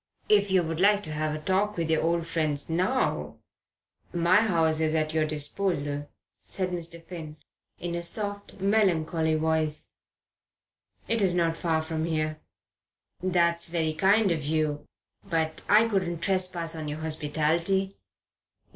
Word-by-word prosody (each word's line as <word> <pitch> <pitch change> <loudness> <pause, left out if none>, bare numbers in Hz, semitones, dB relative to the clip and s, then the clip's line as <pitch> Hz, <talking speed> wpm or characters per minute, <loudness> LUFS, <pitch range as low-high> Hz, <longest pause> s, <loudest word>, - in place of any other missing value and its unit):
"If 205 -1 +4
you 190 -2 +3
would 165 0 -3
like 205 +2 +4
to 155 - -6
have 155 0 -1
a - - -5
talk 190 +5 0
with 165 -1 -1
your 160 - +2
old 170 0 0
friends 155 -2 -1
now, 185 +11 0 0.7
my 175 +2 +3
house 165 -7 +2
is 160 0 +1
at 155 0 0
your 155 -1 +1
disposal," 145 -1 -1 0.3
said 185 -1 -3
Mr. 170 -1 -5
Finn, 160 -4 -8 0.4
in 175 0 -4
a 170 - -2
soft, 205 +3 -2
melancholy 170 -6 +2
voice. 155 -1 0 1.2
"It 230 -1 +1
is 185 -3 +2
not 165 -2 +1
far 160 -2 0
from 160 0 -2
here." 155 -1 -1 0.8
"That's 170 -2 +1
very 160 -2 0
kind 195 +4 +3
of 160 -3 -1
you 150 0 -1 0.4
but 160 -1 -2
I 215 +2 +6
couldn't 185 -6 -1
trespass 185 -3 +1
on 155 -1 -5
your 150 +1 -5
hospitality." 160 +5 0
165 Hz, 145 wpm, -27 LUFS, 155-185 Hz, 1.2 s, I